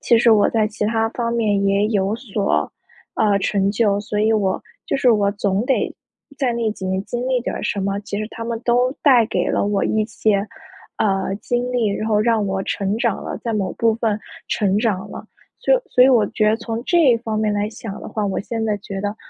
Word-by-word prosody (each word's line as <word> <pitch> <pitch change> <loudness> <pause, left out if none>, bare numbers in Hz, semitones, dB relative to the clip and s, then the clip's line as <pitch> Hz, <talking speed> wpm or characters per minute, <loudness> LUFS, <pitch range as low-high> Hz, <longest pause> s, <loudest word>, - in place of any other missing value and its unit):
其 235 - +4
实 230 0 +4
我 210 -2 +5
在 215 -2 +1
其 210 0 -3
他 225 0 +1
方 235 0 -3
面 210 -4 +1
也 200 +1 +2
有 200 -2 0
所， 215 -5 -1 0.4
呃， 205 -2 +2
成 200 0 +1
就， 205 -1 +1
所 210 0 -4
以 220 +1 +3
我 195 -3 +1 0.3
就 - - 0
是 255 - +2
我 200 -2 +2
总 200 +1 -1
得 265 - 0 0.4
在 260 -4 0
那 230 -2 -1
几 190 - -9
年 190 +1 -1
经 245 +1 -4
历 255 -2 +1
点 - - -3
儿 - - -5
什 200 - -1
么， 195 +1 -1
其 205 0 -5
实 215 - -3
它 230 - -7
们 230 -1 -3
都 245 +1 +3
带 250 -6 +6
给 - - -1
了 - - +1
我 200 -1 0
一 215 -1 +1
些， 215 -1 0 0.6
呃， 195 -2 0
经 245 +2 -1
历， 240 -3 +1
然 215 +2 -2
后 210 -1 +3
让 225 -2 +2
我 190 0 -1
成 200 +2 -1
长 235 -4 0
了 - - -5
在 230 - -3
某 200 -3 -1
部 225 -1 +2
分 220 -2 -1 0.3
成 200 -2 +1
长 210 -5 -1
了。 - - -9 0.3
所 - - +2
以 - - +3
所 250 - +4
以 - - +6
我 230 -5 +4
觉 215 -2 +1
得 220 - +1
从 225 0 -5
这 315 -9 +4
方 220 -2 -3
面 215 -1 +1
来 205 +1 0
想 215 -2 -8
的 - - -8
话， 215 -2 -2
我 195 - -2
现 225 +2 -3
在 210 - 0
觉 195 0 -6
得 205 +2 -3
215 Hz, 250 characters per minute, -20 LUFS, 200-230 Hz, 0.6 s, 带